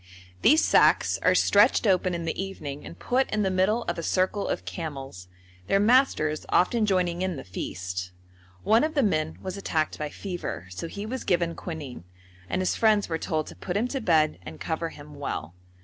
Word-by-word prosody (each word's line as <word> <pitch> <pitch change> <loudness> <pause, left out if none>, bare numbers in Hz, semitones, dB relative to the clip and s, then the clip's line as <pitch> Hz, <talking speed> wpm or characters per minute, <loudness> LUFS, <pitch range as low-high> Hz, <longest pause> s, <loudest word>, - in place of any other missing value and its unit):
These 310 +2 +5
sacks - - +4
are - - +4
stretched - - +4
open 185 -2 +2
in 170 -1 -4
the 165 +3 -2
evening 150 -7 -7
and 85 +1 -10
put 260 - 0
in 210 -1 0
the 190 - +1
middle 190 +5 +2
of 170 0 -3
a - - -2
circle 185 +4 0
of 90 - -3
camels, 135 - -6 0.4
their 195 - +3
masters 205 - +3
often 215 +4 +3
joining 180 -3 +1
in 185 -2 -1
the 135 - -7
feast. 90 0 -5 0.5
One 225 +4 +4
of 310 +1 -1
the 280 - +3
men 155 -6 0
was 185 +1 -5
attacked 160 -5 -1
by 150 -1 -3
fever, 175 - -5
so 90 - -5
he 200 +5 -6
was 255 +4 -4
given 170 -2 +1
quinine, 150 - -7 0.5
and 185 - 0
his 185 - 0
friends 215 -4 +3
were 165 -1 -1
told 155 -1 -1
to - - -11
put 180 +1 -3
him 230 +4 +1
to 270 0 -3
bed 155 - +2
and 85 -3 -10
cover 165 +1 -2
him 145 -1 -12
well. 85 - -4
175 Hz, 195 wpm, -26 LUFS, 150-200 Hz, 0.5 s, These